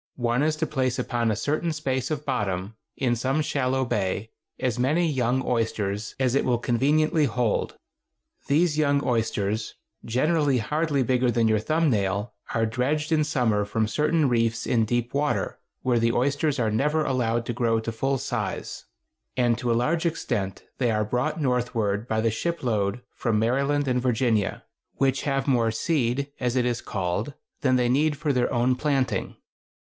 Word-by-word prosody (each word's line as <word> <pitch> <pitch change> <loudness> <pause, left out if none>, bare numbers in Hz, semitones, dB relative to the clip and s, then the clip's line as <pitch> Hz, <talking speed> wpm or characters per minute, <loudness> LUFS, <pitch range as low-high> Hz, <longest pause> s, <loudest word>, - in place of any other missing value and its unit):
One 120 +1 0
is 155 +1 +2
to 155 +1 -1
place 130 -4 -1
upon 120 -2 0
a 110 - +1
certain 155 +9 -1
space 135 -5 -2
of 150 -1 -3
bottom, 100 -5 -2 0.2
in 125 -3 +1
some 135 +6 0
shallow 130 -2 0
bay, 105 0 -2 0.3
as 125 -2 -1
many 155 +7 +2
young 130 -3 0
oysters 110 -3 -1
as 130 -2 +2
it 140 - +2
will 125 -2 +2
conveniently 150 +6 +2
hold. 120 -3 0 0.7
These 155 +1 +2
young 145 -1 +2
oysters, 110 -2 -1 0.3
generally 145 +3 +2
hardly 145 +4 0
bigger 125 0 +2
than 115 -1 +2
your 110 -1 +3
thumb 155 +7 +1
nail, 100 0 -1 0.2
are 115 0 +2
dredged 135 +7 -1
in 155 -1 +3
summer 120 -9 +1
from 110 +2 -1
certain 150 +5 +2
reefs 115 -2 +1
in 115 -2 +2
deep 120 +1 -1
water, 145 +1 -1 0.2
where 125 -2 +2
the 115 0 +2
oysters 140 +3 +1
are 115 -4 +1
never 150 +7 +1
allowed 120 -3 0
to 120 - -2
grow 115 -1 +1
to 115 - -3
full 135 +4 0
size; 120 -7 -4 0.5
and 120 -2 +3
to 120 -1 0
a - - +3
large 160 +8 +1
extent 100 - -3 0.2
they 125 -2 +2
are 110 -1 +1
brought 125 +8 -1
northward 120 -5 0
by 110 -1 0
the 115 0 +2
ship 170 +9 -3
load 105 -1 0
from 115 -3 0
Maryland 140 +6 +1
and 125 -1 +1
Virginia, 120 -4 0 0.3
which 135 -1 +1
have 135 0 0
more 120 -4 +3
"seed," 140 +2 0
as 125 -1 -1
it 125 -1 +2
is 120 -1 -1
called, 100 +8 -3 0.3
than 130 -2 +3
they 125 -1 +2
need 145 +4 +2
for 150 -1 0
their 125 -1 +1
own 125 +2 +2
planting. 135 -1 -1
125 Hz, 175 wpm, -25 LUFS, 115-140 Hz, 0.7 s, your